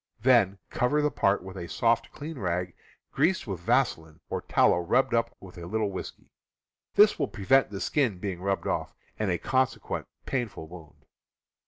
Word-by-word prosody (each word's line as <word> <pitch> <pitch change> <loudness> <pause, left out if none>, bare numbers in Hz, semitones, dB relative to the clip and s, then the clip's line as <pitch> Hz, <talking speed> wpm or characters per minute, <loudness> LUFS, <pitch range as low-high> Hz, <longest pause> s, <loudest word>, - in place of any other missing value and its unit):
Then 115 -7 +4
cover 125 +5 +1
the 150 - +2
part 100 -1 +1
with 95 0 -9
a 85 -2 -6
soft, 115 0 +1
clean 150 -1 -7
rag 90 -2 -2 0.4
greased 170 +7 +1
with 95 -6 -4
vaselin, 80 -2 0
or - - -2
tallow - - +3
rubbed 125 +9 +1
up 115 0 0
with 90 -2 -12
a 85 - -7
little 105 +1 -1
whiskey. 95 - -8 0.6
This - - +6
will - - +1
prevent 135 +7 +2
the 100 -2 -6
skin 125 -8 +1
being 90 -2 -5
rubbed 100 0 -1
off, - - -2 0.2
and 110 -2 0
a 90 - +1
consequent 130 +4 -1 0.2
painful 115 -11 -3
wound. 80 -2 -14
100 Hz, 170 wpm, -28 LUFS, 90-125 Hz, 0.6 s, This